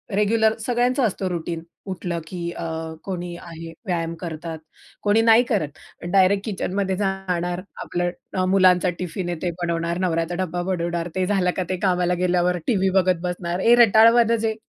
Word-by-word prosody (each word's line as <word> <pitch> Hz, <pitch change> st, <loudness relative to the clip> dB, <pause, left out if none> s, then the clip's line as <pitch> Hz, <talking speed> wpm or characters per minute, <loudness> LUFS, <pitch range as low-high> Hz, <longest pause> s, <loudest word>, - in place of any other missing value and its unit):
Regular. 220 Hz, +1 st, +3 dB
सगळ्यांचा 245 Hz, +2 st, +1 dB
असतो 195 Hz, -3 st, -2 dB
routine 170 Hz, -1 st, -4 dB, 0.3 s
उठलं 175 Hz, -2 st, -3 dB
की 170 Hz, -1 st, -4 dB
अ, -, -, -6 dB, 0.4 s
कोणी 175 Hz, -2 st, -5 dB
आहे 165 Hz, -1 st, -9 dB, 0.2 s
व्यायाम 170 Hz, -2 st, -1 dB
करतात, 165 Hz, -1 st, -6 dB, 0.4 s
कोणी 210 Hz, +2 st, +4 dB
नाही 225 Hz, +1 st, +6 dB
करत 195 Hz, -, -2 dB, 0.4 s
डायरेक्ट 195 Hz, +2 st, +4 dB
किचनमध्ये 195 Hz, -2 st, -2 dB
जाणार. 185 Hz, -3 st, -2 dB, 0.2 s
आपलं 175 Hz, 0 st, -1 dB, 0.3 s
अ, 185 Hz, -, +2 dB
मुलांचा 185 Hz, -1 st, +4 dB
टिफिन 180 Hz, 0 st, -4 dB
आहे 175 Hz, -, -2 dB
ते 175 Hz, -, 0 dB
बनवणार, 170 Hz, 0 st, -1 dB
नवऱ्याचा 170 Hz, -1 st, 0 dB
डब्बा 175 Hz, 0 st, -3 dB
बनवणार, 175 Hz, -2 st, -2 dB
ते 185 Hz, -1 st, +1 dB
झालं 190 Hz, -3 st, +2 dB
का 185 Hz, -, +1 dB
ते 185 Hz, -, -1 dB
कामाला 180 Hz, -1 st, +2 dB
गेल्यावर 180 Hz, 0 st, +2 dB
टीव्ही 195 Hz, -5 st, +2 dB
बघत 185 Hz, -2 st, +1 dB
बसणार. 175 Hz, 0 st, -3 dB
हे 235 Hz, +4 st, +6 dB
रटाळवाणं 230 Hz, 0 st, +6 dB
जे, 220 Hz, -, 0 dB
180 Hz, 160 wpm, -23 LUFS, 175-200 Hz, 0.4 s, नाही